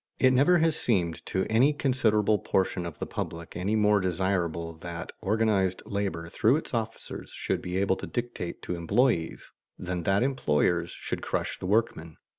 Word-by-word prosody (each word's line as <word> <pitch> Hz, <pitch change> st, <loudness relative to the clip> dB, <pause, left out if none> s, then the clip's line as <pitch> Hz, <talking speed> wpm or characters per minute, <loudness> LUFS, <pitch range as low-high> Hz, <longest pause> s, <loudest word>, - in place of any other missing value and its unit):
It 130 Hz, -, +5 dB
never 145 Hz, +8 st, +5 dB
has 165 Hz, -2 st, +2 dB
seemed 90 Hz, -8 st, 0 dB
to 95 Hz, 0 st, 0 dB
any 125 Hz, +7 st, +4 dB
considerable 110 Hz, -7 st, +2 dB
portion 95 Hz, -2 st, 0 dB
of 80 Hz, -, -8 dB
the -, -, -4 dB
public 85 Hz, 0 st, -6 dB
any 100 Hz, +5 st, 0 dB
more 105 Hz, -1 st, +4 dB
desirable 90 Hz, -3 st, -1 dB
that 85 Hz, 0 st, -6 dB
organized 100 Hz, -3 st, +1 dB
labor 100 Hz, -6 st, -3 dB
through 110 Hz, +8 st, +3 dB
its 155 Hz, -, -4 dB
officers 115 Hz, -1 st, -4 dB
should -, -, -2 dB
be 90 Hz, +1 st, -3 dB
able 95 Hz, 0 st, +2 dB
to -, -, -6 dB
dictate 120 Hz, -8 st, -4 dB
to -, -, -3 dB
employees, 85 Hz, +1 st, 0 dB, 0.3 s
than 90 Hz, -1 st, -3 dB
that 95 Hz, +5 st, +2 dB
employers 85 Hz, -, +1 dB
should -, -, -5 dB
crush -, -, -2 dB
the 90 Hz, -, -4 dB
workmen. 90 Hz, -7 st, 0 dB
100 Hz, 165 wpm, -28 LUFS, 85-115 Hz, 0.3 s, It